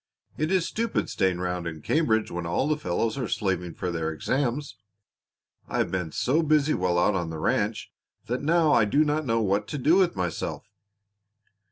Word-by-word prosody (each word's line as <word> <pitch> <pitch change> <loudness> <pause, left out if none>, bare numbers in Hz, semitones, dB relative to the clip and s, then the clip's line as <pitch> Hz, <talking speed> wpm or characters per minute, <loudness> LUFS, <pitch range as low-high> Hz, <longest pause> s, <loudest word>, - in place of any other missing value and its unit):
"It 155 +3 -1
is 185 -3 +2
stupid 230 0 -2
staying 95 -2 +1
round 90 -1 -2
in 80 -3 -7
Cambridge 110 - +1
when 85 -1 -4
all 85 - 0
the 155 - +2
fellows 110 0 -1
are 125 - -2
slaving 90 -4 -2
for 90 - -3
their 80 -1 -2
exams. 130 - -2 0.9
I - - -3
have - - 0
been 90 -4 -2
so 140 - +1
busy 155 -1 +3
while 90 -1 0
out 95 +4 +3
on 85 -3 -2
the 80 - -5
ranch 75 - -1 0.3
that 125 +2 -2
now 160 0 +3
I 115 - +5
do 145 +9 +3
not 150 0 -1
know 115 0 +2
what 100 0 0
to 145 - -4
do 155 +7 +4
with 185 - +3
myself." 90 -3 -3
110 Hz, 190 wpm, -26 LUFS, -, 0.9 s, I